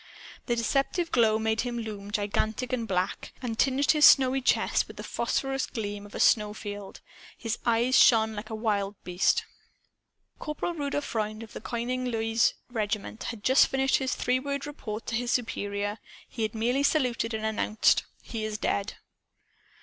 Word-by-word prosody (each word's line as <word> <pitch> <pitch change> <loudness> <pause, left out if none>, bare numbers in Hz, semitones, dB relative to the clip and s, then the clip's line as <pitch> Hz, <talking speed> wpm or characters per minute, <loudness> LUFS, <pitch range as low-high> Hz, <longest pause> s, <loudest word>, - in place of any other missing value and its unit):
The 240 - +1
deceptive 275 +8 0
glow 220 -3 +4
made 220 0 0
him 240 -1 -3
loom 210 -3 -6
gigantic 215 +4 -1
and 235 -3 -1
black, 185 -2 -2
and 230 -3 -4
tinged 270 +2 +3
his 300 -1 +2
snowy 265 -2 +7
chest - - +2
with - - -12
the - - -6
phosphorous 270 0 -1
gleam 205 -2 -5
of 205 - -13
a - - -4
snowfield. 210 -2 0 0.4
His 230 0 -3
eyes 235 +3 +4
shone 220 -2 +5
like 215 +1 -7
a 220 - -4
wild 205 -2 -1
beast's. 180 +1 +2 1.0
Corporal 300 +3 -3
Rudolph 290 -2 -2
Freund, 215 0 -3
of 220 - -12
the - - -7
Konigin 250 +2 -2
Luise 225 0 +2 0.2
Regiment, 215 -1 -3
had 230 -4 -6
just 260 +1 +5
finished 270 0 +2
his 260 -1 -1
three 250 +1 +1
word 280 +1 -3
report 230 -7 -6
to - - -4
his 240 +1 -1
superior. 205 -3 -2 0.3
He 230 - -7
had 220 +1 -1
merely 245 +5 +1
saluted 250 -6 +1
and 220 0 -3
announced 220 0 +2 0.2
"He 225 -2 -5
is 215 -1 -3
dead!" 200 -1 -1
225 Hz, 165 wpm, -28 LUFS, 215-255 Hz, 1.0 s, snowy